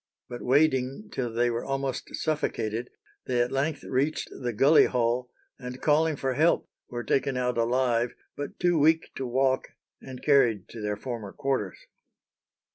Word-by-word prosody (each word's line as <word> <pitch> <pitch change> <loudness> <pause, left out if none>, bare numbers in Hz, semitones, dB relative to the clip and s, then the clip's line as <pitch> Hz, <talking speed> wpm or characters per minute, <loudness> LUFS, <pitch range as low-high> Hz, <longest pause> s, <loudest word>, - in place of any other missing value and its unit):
"But 120 - -7
wading 135 +5 +2
till 120 -3 -2
they 120 +1 +1
were 115 0 -2
almost 135 -1 -3
suffocated, 120 -7 -2 0.4
they 125 -1 +1
at 120 +1 +1
length 140 +2 -1
reached 140 +4 -1
the 125 -2 -4
gully 135 +8 +6
hole, 125 0 0 0.3
and 125 0 -7
calling 155 +2 +3
for 135 -1 -1
help, 160 +5 +2 0.2
were 120 -1 -4
taken 135 0 0
out 125 -1 0
alive, 120 0 +1 0.2
but 145 - -6
too 175 -2 +3
weak 160 +2 +3
to 130 - -3
walk, 130 +1 +1 0.3
and 130 -1 -10
carried 125 -9 +3
to 115 - -8
their 105 0 -2
former 115 -4 -6
quarters." 135 -9 -2
130 Hz, 155 wpm, -27 LUFS, 120-140 Hz, 0.4 s, gully